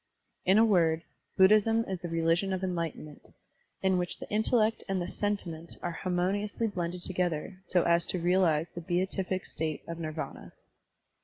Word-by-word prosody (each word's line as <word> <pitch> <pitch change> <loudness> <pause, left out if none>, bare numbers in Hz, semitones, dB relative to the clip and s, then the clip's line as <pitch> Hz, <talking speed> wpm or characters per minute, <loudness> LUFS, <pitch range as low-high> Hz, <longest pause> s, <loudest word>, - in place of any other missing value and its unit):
In 190 +3 +5
a 225 - +7
word. 165 -6 +3 0.3
Buddhism 215 +4 +5
is 190 -2 -3
the 175 - -5
religion 165 +3 +1
of 185 0 -3
enlightenment, 165 -5 -4 0.5
in 190 -1 +3
which 175 -1 -2
the - - -8
intellect 220 +1 +2
and 195 -1 0
the 175 - -2
sentiment 180 -5 -3
are 175 - -1
harmoniously 190 +6 -1
blended 180 -4 -3
together 180 0 -2
so 180 -1 +1
as 170 0 +2
to - - -1
realize 170 -3 +3
the 175 - -6
beatific 185 +2 -1
state 155 -2 -3
of 170 0 -5
Nirvana. 155 -1 -6
180 Hz, 155 wpm, -30 LUFS, 170-195 Hz, 0.5 s, a